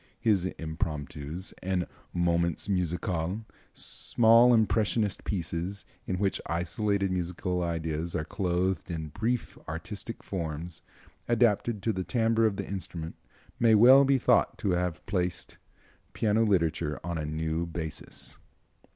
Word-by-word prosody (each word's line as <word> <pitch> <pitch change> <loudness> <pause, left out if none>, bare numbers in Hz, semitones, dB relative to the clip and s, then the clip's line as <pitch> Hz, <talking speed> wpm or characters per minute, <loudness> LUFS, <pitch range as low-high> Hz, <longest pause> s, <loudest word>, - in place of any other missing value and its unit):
His 100 -5 +2
Impromptus 80 +1 -4
and 90 -1 0 0.3
Moments 85 -1 +1
Musical, 90 +1 -1 0.3
small 115 +1 +4
impressionist 110 -1 +2
pieces, 90 +1 -3 0.2
in 95 - -1
which 95 0 0
isolated 100 +3 0
musical 90 0 -1
ideas 85 -1 -2
are 75 - -1
clothed 90 +1 -1
in 80 -2 -4
brief 115 +9 -2
artistic 100 +7 -6
forms 85 -2 -4 0.5
adapted 115 -2 +2
to 110 - +1
the 95 -1 -2
timbre 115 +1 +2
of 105 - -1
the - - -4
instrument, 85 -4 -5 0.4
may 115 -2 +6
well 130 +6 +8
be 135 0 +4
thought 125 -1 +3
to 100 -4 0
have 90 -2 -1
placed 90 -3 -2 0.5
piano 110 0 +2
literature 85 -6 +1
on 85 -1 -3
a 75 - -2
new 80 +2 -1
basis. 80 -2 -5
90 Hz, 125 wpm, -29 LUFS, 85-105 Hz, 0.5 s, well